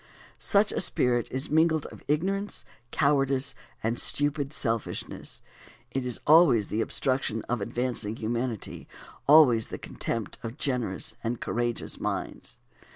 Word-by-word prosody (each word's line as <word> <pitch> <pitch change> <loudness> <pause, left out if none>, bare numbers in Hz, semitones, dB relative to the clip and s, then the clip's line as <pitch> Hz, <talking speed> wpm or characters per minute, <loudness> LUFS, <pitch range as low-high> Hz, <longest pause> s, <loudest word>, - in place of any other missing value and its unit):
Such 205 +1 +3
a - - +1
spirit 125 -8 +2
is 130 +4 -2
mingled 160 0 +3
of - - -12
ignorance, 195 +7 -1 0.2
cowardice, 135 -1 +2 0.3
and 115 +2 0
stupid 145 -1 +1
selfishness. 115 -7 -3 0.5
It 130 -1 -2
is 125 - -1
always 150 - +6
the 110 - 0
obstruction 130 -3 -1
of 120 -2 -2
advancing 115 -1 -1
humanity, 115 0 -3 0.4
always 135 -7 +7
the - - -6
contempt 115 -4 -4
of 115 +3 -6
generous 125 -10 -1
and 115 +1 -2
courageous 120 0 -2
minds. - - -4
130 Hz, 125 wpm, -28 LUFS, 115-145 Hz, 0.5 s, always